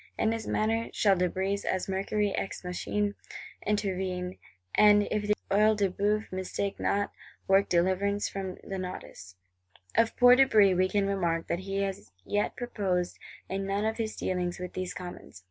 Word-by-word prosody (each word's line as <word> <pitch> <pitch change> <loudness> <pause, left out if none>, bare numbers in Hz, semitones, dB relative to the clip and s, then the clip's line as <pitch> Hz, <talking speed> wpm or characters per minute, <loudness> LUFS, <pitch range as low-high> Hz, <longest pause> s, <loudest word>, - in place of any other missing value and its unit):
In 220 - +2
this 225 -1 -3
manner 225 +1 0
shall 200 -2 +4
De 180 0 +1
Brézé, 195 +3 -2
as 185 - -1
Mercury 200 +1 0
ex 195 - -4
machinâ, 200 +3 -1 0.5
intervene; 185 -3 -1 0.3
and, 205 -1 +6
if 210 -1 -1
the 210 - +3 0.2
Œil 215 +2 +4
de 200 -3 +1
Bœuf 210 +3 0
mistake 190 +1 -3
not, 200 0 0 0.4
work 195 +1 +4
deliverance 190 +4 +1
from 190 -2 -5
the 195 -1 -5
nodus. 180 - -8 0.6
Of 230 0 +2
poor 245 0 +8
De 270 +1 +6
Brézé 200 -6 +5
we 185 +1 +2
can 200 0 +1
remark 175 -4 0
that 170 - 0
he 195 +1 -2
has 190 - -5
yet 205 0 0
prospered 195 -8 -1 0.4
in 195 +1 -3
none 200 +2 0
of 220 0 -1
his 220 -2 -2
dealings 180 -1 -2
with 180 0 -6
these 185 -1 -4
Commons. 175 - -9
195 Hz, 170 wpm, -29 LUFS, 185-210 Hz, 0.6 s, poor